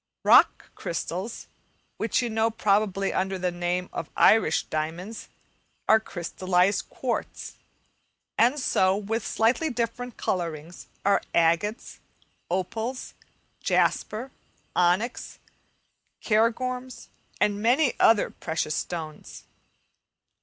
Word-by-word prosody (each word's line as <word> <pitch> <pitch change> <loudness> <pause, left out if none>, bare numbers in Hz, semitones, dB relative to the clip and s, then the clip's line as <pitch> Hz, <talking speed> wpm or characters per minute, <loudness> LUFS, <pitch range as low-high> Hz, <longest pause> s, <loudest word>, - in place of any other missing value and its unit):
Rock - - +5
crystals, 180 +6 -5 0.5
which - - 0
you 240 - -1
know 220 +1 +2
probably 200 -3 +1
under 190 0 -1
the 180 -1 -1
name 175 +1 -2
of 160 - -5
Irish 215 -8 +4
diamonds, 165 +8 -5 0.6
are 220 - +6
crystallized 185 0 0
quartz; 250 -3 -4 0.8
and 250 +6 +3
so, 190 -7 +2
with 210 +2 -2
slightly 240 +8 +1
different 240 -1 -3
colourings, 170 -2 -4 0.2
are 200 - +4
agates, 170 +7 +1 0.5
opals, 220 +8 -3 0.5
jasper, 240 +5 0 0.4
onyx, 180 +8 0 0.8
cairngorms, 250 +3 -1 0.3
and 205 0 +1
many 250 +5 +3
other 225 -2 +4
precious 160 -2 -3
stones. 160 -3 -6
205 Hz, 95 wpm, -26 LUFS, 180-230 Hz, 0.8 s, are